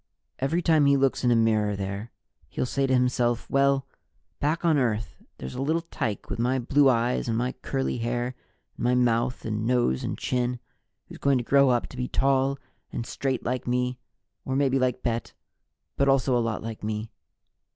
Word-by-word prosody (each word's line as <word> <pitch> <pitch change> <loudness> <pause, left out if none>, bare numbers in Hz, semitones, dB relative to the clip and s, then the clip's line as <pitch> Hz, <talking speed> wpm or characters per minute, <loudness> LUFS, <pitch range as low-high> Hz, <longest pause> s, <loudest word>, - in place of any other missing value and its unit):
"Every 160 +7 0
time 155 -3 +4
he 140 0 +5
looks 135 -1 +1
in 125 - +3
a 120 - +4
mirror 110 -2 +2
there, 100 +3 -5 0.4
he'll 95 - -2
say 135 +2 0
to 130 - +1
himself, 125 -2 +1
'Well, 140 0 +3 0.5
back 155 +4 0
on 160 -3 +4
Earth, 110 -5 -1 0.2
there's 65 0 -7
a - - -4
little 160 +4 0
tyke 110 - -4
with - - -5
my 125 +3 +1
blue 135 +3 +4
eyes 120 0 +1
and 115 -1 0
my 125 +2 0
curly 135 -2 -2
hair 120 +2 -2 0.4
and - - -6
my 125 +1 +3
mouth 120 0 +1
and 110 -1 -2
nose 120 - +1
and - - -3
chin, 125 -1 -1 0.5
who's - - -12
going 140 -1 +3
to 120 - -2
grow 140 +2 +4
up 120 -2 +2
to 130 - -11
be 125 0 -2
tall 135 0 +1 0.3
and 115 - -4
straight 130 -1 -2
like 125 +1 -2
me 125 0 0 0.4
or 130 - -2
maybe 135 -1 +2
like 125 -1 0
Bet, 115 -1 -2 0.6
but 140 0 +3
also 135 -1 +3
a - - +3
lot 115 -2 -2
like 115 -1 -6
me.' 110 +1 -3
125 Hz, 195 wpm, -26 LUFS, 115-135 Hz, 0.6 s, he